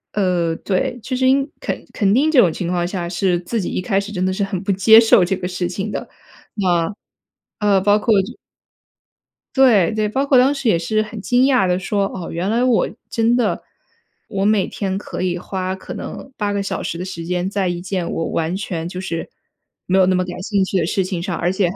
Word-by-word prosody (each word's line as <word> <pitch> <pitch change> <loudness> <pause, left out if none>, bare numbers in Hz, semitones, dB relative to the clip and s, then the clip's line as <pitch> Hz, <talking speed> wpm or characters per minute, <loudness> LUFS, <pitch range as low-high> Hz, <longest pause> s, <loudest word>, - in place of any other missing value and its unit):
呃， 180 -5 +1
对。 200 +5 -1
其 255 - -3
实 260 0 +2
因 275 +2 +3
肯 - - -4
肯 200 -3 +2
定 290 +7 +3
这 290 - +5
种 180 -8 +5
情 170 +2 -4
况 175 -1 0
下， 180 -2 -3
是 180 0 +1
自 225 +6 -2
己 190 - -3
一 - - -2
开 195 0 +1
始 200 +1 -6
真 185 -2 -1
的 185 - +1
是 190 +2 -1
很 190 -2 -4
不 200 - 0
接 200 +4 +6
受 225 -4 +5
这 190 - 0
个 180 - -6
事 180 -1 -2
情 195 +4 -4
的。 - - -4 0.5
那， 180 -1 +1 0.6
呃， 205 -2 +3
包 205 +1 +4
括 225 +1 +2
就 195 - -8 1.2
对， 225 -10 +5
对， 215 -1 0
包 270 +6 0
括 275 -2 +4
当 260 +3 +5
时 275 -3 -3
也 210 - +4
是 215 +6 0
很 215 0 -6
惊 245 +5 +2
讶 255 -6 +3
地 180 0 +1
说： 195 +1 0
“哦， 180 -3 -6
原 175 +4 -2
来 235 +2 +1
我 250 -3 +2 0.2
真 230 +1 +2
的 245 - 0 0.6
我 195 -1 -2
每 205 -2 +3
天 195 -2 -3
可 200 - -6
以 180 -1 0
花 185 +1 -3
可 190 - -8
能 - - -7
8 205 -1 -1
个 200 0 -1
小 195 - -3
时 - - -3
的 180 - -4
时 170 -3 -6
间， 180 +1 -1
在 195 -2 -1
一 175 0 -3
件 180 -1 -3
我 165 - -2
完 165 +1 -1
全 170 -4 -4
就 180 +1 -5
是 170 -3 -4 0.6
没 185 - +2
有 190 - +6
那 185 - +3
么 185 0 +1
感 180 0 -7
兴 200 -1 0
趣 190 - -1
的 170 - +1
事 190 +2 0
情 180 -2 -3
上， 180 -3 -3
而 175 +2 0
且 190 -2 +1
还 185 - -6
190 Hz, 250 characters per minute, -20 LUFS, 180-215 Hz, 1.2 s, 接